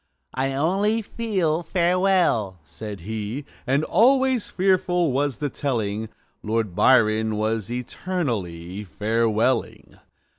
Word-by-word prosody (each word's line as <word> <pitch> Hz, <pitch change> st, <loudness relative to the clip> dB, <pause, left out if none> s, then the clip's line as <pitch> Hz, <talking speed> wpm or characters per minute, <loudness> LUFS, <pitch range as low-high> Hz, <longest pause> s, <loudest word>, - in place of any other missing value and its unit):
"I 135 Hz, +1 st, -1 dB
only 195 Hz, +10 st, +1 dB
feel 190 Hz, -8 st, -1 dB
farewell!" 175 Hz, -, +1 dB
said 100 Hz, +6 st, -8 dB
he; 110 Hz, -, -5 dB, 0.2 s
And 135 Hz, +4 st, +2 dB
always 260 Hz, +3 st, +3 dB
fearful 180 Hz, -3 st, +1 dB
was 140 Hz, -1 st, 0 dB
the 145 Hz, -1 st, -2 dB
telling 110 Hz, -6 st, -2 dB, 0.3 s
Lord 110 Hz, -4 st, -2 dB
Byron 110 Hz, -3 st, +4 dB
was 110 Hz, -1 st, -1 dB
eternally 115 Hz, -, -4 dB
Farewelling. 110 Hz, +6 st, -1 dB
130 Hz, 100 wpm, -23 LUFS, 110-180 Hz, 0.3 s, Byron